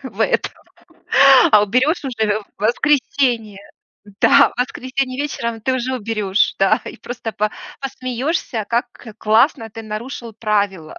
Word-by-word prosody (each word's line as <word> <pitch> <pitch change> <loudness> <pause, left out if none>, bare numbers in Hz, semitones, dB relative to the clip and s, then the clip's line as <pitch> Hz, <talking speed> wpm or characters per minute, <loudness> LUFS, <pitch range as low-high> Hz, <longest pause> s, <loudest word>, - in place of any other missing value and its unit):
в - - -9
этом, - - -1 1.0
а 210 -1 +7
уберёшь 255 - +1
уже 220 -4 -1
в - - -16
в 205 - -12
воскресенье. 240 -4 +1 0.6
Да, - - +5
в - - -1
воскресенье 255 +1 -3
вечером 235 -6 -3
ты 260 +4 0
уже 255 +1 -2
уберёшь. 210 -4 0
Да, 195 0 +3
и - - -7
просто 235 -2 -6
па 210 +1 -1 0.3
посмеёшься, 255 -2 -3
как 235 +1 0 0.3
классно 225 +1 +2
ты 225 +1 -9
нарушил 225 +2 -7
правила. 200 -7 -2
230 Hz, 135 wpm, -19 LUFS, 215-255 Hz, 1.0 s, а